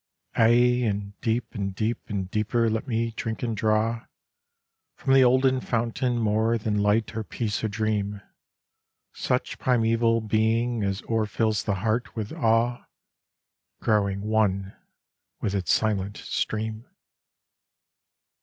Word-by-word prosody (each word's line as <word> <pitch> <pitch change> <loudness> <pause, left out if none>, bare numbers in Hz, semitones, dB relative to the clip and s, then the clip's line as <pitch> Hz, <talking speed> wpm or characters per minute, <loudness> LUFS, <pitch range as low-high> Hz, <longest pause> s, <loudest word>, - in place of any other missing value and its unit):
Aye, 120 +2 +4
and 100 -1 -3
deep 115 +1 -1
and 100 -4 -3
deep 110 +3 -1
and 100 -3 -2
deeper 115 +2 +1
let 110 +4 -2
me 115 -1 0
drink 115 +1 -4
and 115 -2 -1
draw 110 +2 +1 0.9
From 135 - 0
the 135 -1 +7
olden 130 +1 +3
fountain 120 +1 -1
more 110 +1 +2
than 105 -2 -1
light 105 +2 +1
or 110 - -2
peace 105 -1 -3
or - - +2
dream, 105 -1 -1 0.9
Such - - -2
primeval 115 -2 +2
being 110 +2 +1
as 100 -1 -2
o'erfills 110 -1 0
the 100 - 0
heart 115 +2 -1
with 110 -2 -4
awe, 115 +1 +1 0.9
Growing 100 -2 +1
one 100 -2 0 0.6
with 100 - -2
its 95 -4 0
silent 100 -2 0
stream. 110 +1 -3
110 Hz, 125 wpm, -26 LUFS, 105-115 Hz, 0.9 s, the